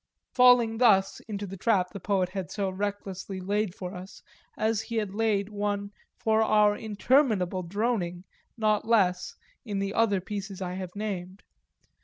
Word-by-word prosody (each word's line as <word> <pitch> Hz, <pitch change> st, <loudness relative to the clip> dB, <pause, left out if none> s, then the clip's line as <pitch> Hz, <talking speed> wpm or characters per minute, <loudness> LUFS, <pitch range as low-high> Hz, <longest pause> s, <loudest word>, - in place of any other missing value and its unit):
falling 245 Hz, -3 st, +5 dB
thus 200 Hz, -6 st, +4 dB
into 205 Hz, -2 st, -4 dB
the 195 Hz, 0 st, -7 dB
trap 190 Hz, -2 st, +1 dB
the 200 Hz, -, -7 dB
poet 185 Hz, -1 st, 0 dB
had 185 Hz, -4 st, -5 dB
so 200 Hz, -2 st, -2 dB
recklessly 195 Hz, -1 st, -4 dB
laid 200 Hz, 0 st, -1 dB
for 180 Hz, 0 st, -6 dB
us, 185 Hz, +1 st, -10 dB, 0.3 s
as 220 Hz, 0 st, +1 dB
he 230 Hz, -, -6 dB
had 210 Hz, -3 st, -1 dB
laid 210 Hz, -2 st, +1 dB
one 205 Hz, -1 st, -2 dB, 0.3 s
for 220 Hz, 0 st, +2 dB
our 210 Hz, -1 st, +4 dB
interminable 215 Hz, -4 st, +1 dB
droning, 180 Hz, -2 st, -2 dB, 0.3 s
not 215 Hz, -2 st, +2 dB
less, 185 Hz, -6 st, +2 dB, 0.3 s
in 210 Hz, -5 st, -4 dB
the 195 Hz, 0 st, -2 dB
other 205 Hz, -4 st, +2 dB
pieces 195 Hz, 0 st, -6 dB
I 180 Hz, -2 st, -4 dB
have 185 Hz, 0 st, -6 dB
named. 195 Hz, -2 st, -5 dB
200 Hz, 155 wpm, -28 LUFS, 185-215 Hz, 0.3 s, falling